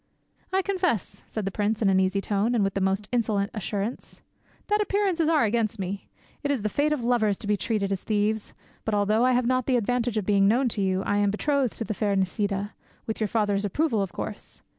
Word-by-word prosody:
"I 380 0 +2
confess," 360 - -1
said 215 -3 -4
the 195 - -2
prince, 210 +2 0
in 215 - +2
an 190 -1 +4
easy 190 +1 +1
tone 210 +4 0
and 220 - +3
with 195 0 0
the 195 - -1
most 195 +2 0
insolent 215 -4 0
assurance, 215 +1 -4 0.5
"that 420 0 +2
appearances 385 -5 +1
are 310 -5 +4
against 225 0 0
me. 195 +1 -4 0.3
It 285 - -2
is 270 -7 0
the 215 - +1
fate 290 +8 +1
of 295 -5 -1
lovers 225 -5 +2
to - - -9
be 210 0 +2
treated 205 -2 -1
as 195 - -1
thieves. 215 0 -1 0.3
But 220 - 0
although 210 +3 +2
I 255 0 +4
have 250 0 +2
not 255 0 +1
the 255 -2 +3
advantage 240 0 0
of 210 - -1
being 200 -1 +4
known 245 +4 +3
to 215 - -2
you, 190 0 +1
I 205 - 0
am 205 0 +3
betrothed 270 +4 0
to - - -2
the 220 - -3
fair 205 -1 0
Nisida—with 200 +3 -3
your 215 - +2
father's 205 -2 +1
approval, 225 - +1
of 195 -3 -2
course. - - -7
215 Hz, 225 wpm, -26 LUFS, 200-245 Hz, 0.5 s, an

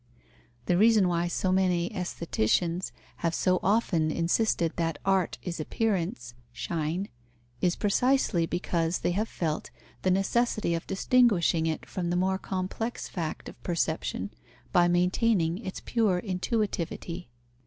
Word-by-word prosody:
The 175 +4 +2
reason 215 -3 +5
why 175 0 +1
so 185 +2 0
many 185 0 +2
aestheticians 170 - 0 0.3
have 165 -1 -1
so 185 0 +2
often 190 -6 +2
insisted 170 +1 +1
that 165 -2 0
art 195 -2 +2
is 175 -3 -4
appearance 170 - -1 0.2
(Schein), 165 +8 -2 0.5
is 180 -1 +2
precisely 210 -5 +2
because 170 -1 0
they - - +3
have 210 +5 -1
felt 160 -3 -2 0.3
the 185 - +1
necessity 195 0 +1
of 165 - -3
distinguishing 195 - +3
it 160 - -2
from 175 -2 -3
the 175 - 0
more 190 +1 +1
complex 195 +6 -3
fact 165 -4 -4
of - - -11
perception 160 - -2 0.4
by 175 -1 +5
maintaining 180 0 +2
its 190 -5 -6
pure 215 -6 +2
intuitivity. 180 -3 -2
180 Hz, 130 wpm, -28 LUFS, 170-195 Hz, 0.5 s, reason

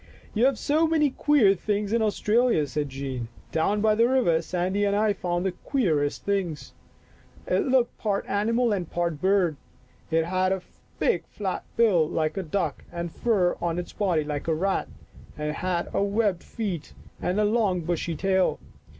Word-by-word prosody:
" - - -25
You 230 +3 +3
have 270 -2 +3
so 310 +7 +2
many 305 -3 +2
queer 260 -9 +4
things 205 +2 -2
in 230 - +2
Aus 215 -2 0
tralia," 225 -8 +2
said 145 +1 -2
Jean. 135 -3 -4
" - - -27
Down 200 +6 +1
by 215 0 +4
the 230 +3 +3
river 205 -12 +3
Sandy 185 +4 -1
and 200 0 +2
I 210 0 +2
found 175 -1 -2
the 190 - +1
queerest 170 - -1
thing. 195 -6 0 0.9
It - - +1
looked 255 -2 +2
part 205 -2 -1
animal 230 +3 +1
and 180 -5 -3
part 170 -4 -2
bird. 185 -5 +2 0.5
It 165 0 +2
had 185 +2 +1
a 190 -1 -4 0.3
big 175 - +1
flat 195 -3 -4
bill 190 -9 +4
like 155 -1 -1
a 195 - -1
duck 170 -2 -2
and 170 -1 -4
fur 195 -6 +1
on 170 -1 -1
its 180 - -5
body 180 -7 +1
like 150 +1 -4
a 160 - +2
rat, 195 +4 0 0.5
and 150 0 -2
it 150 - -3
had 180 -2 -2
webbed 200 -2 +1
feet 195 -9 -5 0.3
and 185 +3 0
a 210 - +3
long 205 -5 +1
bushy 170 0 -2
tail. 190 +2 +1
190 Hz, 185 wpm, -26 LUFS, 170-215 Hz, 0.9 s, queer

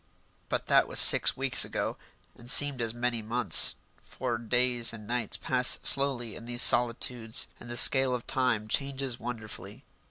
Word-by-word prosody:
But - - -4
that - - +1
was - - -1
six - - +6
weeks 135 -1 +2
ago, - - -6 0.4
and 120 - -15
seemed 140 -1 +4
as 115 -1 -4
many 120 0 -5
months, 110 -4 +4 0.3
for 120 -3 -7
days 120 0 -1
and 110 -2 -11
nights 120 -1 -4
pass 125 -1 0
slowly 130 -5 0
in 115 - -12
these 120 0 -3
solitudes 120 -1 -1
and - - -15
the 120 - -4
scale 130 -1 +4
of 120 - -9
time 120 -5 -3
changes 135 0 -4
wonderfully. 115 -3 -10
120 Hz, 160 wpm, -26 LUFS, 115-125 Hz, 0.4 s, six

